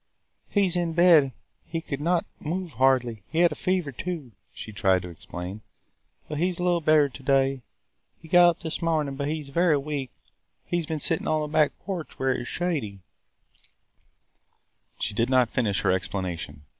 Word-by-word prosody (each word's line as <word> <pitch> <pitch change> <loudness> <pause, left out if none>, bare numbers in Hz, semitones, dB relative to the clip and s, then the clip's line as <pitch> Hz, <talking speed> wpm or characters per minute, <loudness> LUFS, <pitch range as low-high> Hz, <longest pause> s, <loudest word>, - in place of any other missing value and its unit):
"He 205 - +2
was 180 -2 +1
in 170 -2 0
bed; 165 -5 +6 0.3
he 165 - -4
could 145 -3 -5
not 170 +2 +1
move 175 +2 -3
hardly. 125 -5 +2
He 165 - +1
had 175 -2 +5
a - - -2
fever 180 -2 -1
too," 155 -2 -5 0.2
she 110 - -9
tried 95 -3 +2
to 90 - -7
explain. 90 +4 -7 0.7
"But 150 -1 -4
he 180 +3 +2
is 180 - -5
a 175 - -3
little 175 -1 +2
better 155 -2 +5
to 135 0 -12
day. 135 0 +2 0.6
He 165 - -14
got 175 +1 +7
up 170 - -2
this 160 - -3
morning. 155 -4 0
But 140 +1 -3
he 155 +1 -2
is 140 - -12
very 170 +1 +3
weak. 140 -2 -3 0.6
He 175 - -1
has 165 -3 -3
been 160 -1 -2
sitting 160 +2 0
on 155 -1 +1
the 150 - -2
back 155 -2 +3
porch 180 -5 -5
where 130 0 +1
it - - -3
was 120 - -6
shady 140 - -2 0.6
– - - -44
" - - -42
She - - -1
did 115 +4 +1
not 130 -3 +4
finish 105 -6 0
her - - +2
explanation. 90 -6 -3
150 Hz, 200 wpm, -26 LUFS, 125-170 Hz, 0.7 s, got